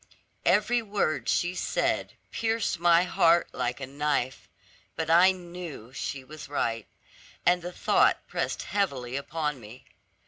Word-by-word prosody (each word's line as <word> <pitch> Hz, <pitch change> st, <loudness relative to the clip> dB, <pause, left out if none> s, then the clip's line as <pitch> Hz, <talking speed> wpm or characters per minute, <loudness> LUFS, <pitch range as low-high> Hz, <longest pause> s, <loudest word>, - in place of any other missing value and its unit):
Every 245 Hz, -1 st, +3 dB
word 200 Hz, -7 st, -1 dB
she 175 Hz, +1 st, +1 dB
said -, -, -1 dB, 0.2 s
pierced 225 Hz, -5 st, -1 dB
my 170 Hz, 0 st, +5 dB
heart 170 Hz, -1 st, +3 dB
like 125 Hz, +1 st, -2 dB
a 135 Hz, -, -4 dB
knife; 140 Hz, -1 st, -2 dB, 0.5 s
but 160 Hz, 0 st, -1 dB
I 175 Hz, +3 st, +7 dB
knew 175 Hz, -9 st, -8 dB
she 135 Hz, -1 st, -4 dB
was 150 Hz, +2 st, -10 dB
right, 115 Hz, -6 st, -1 dB, 0.6 s
and 180 Hz, 0 st, +4 dB
the 175 Hz, +1 st, -6 dB
thought -, -, +2 dB
pressed -, -, -2 dB
heavily 135 Hz, -11 st, -2 dB
upon 150 Hz, 0 st, -3 dB
me. 115 Hz, +3 st, -13 dB
160 Hz, 135 wpm, -27 LUFS, 135-180 Hz, 0.6 s, I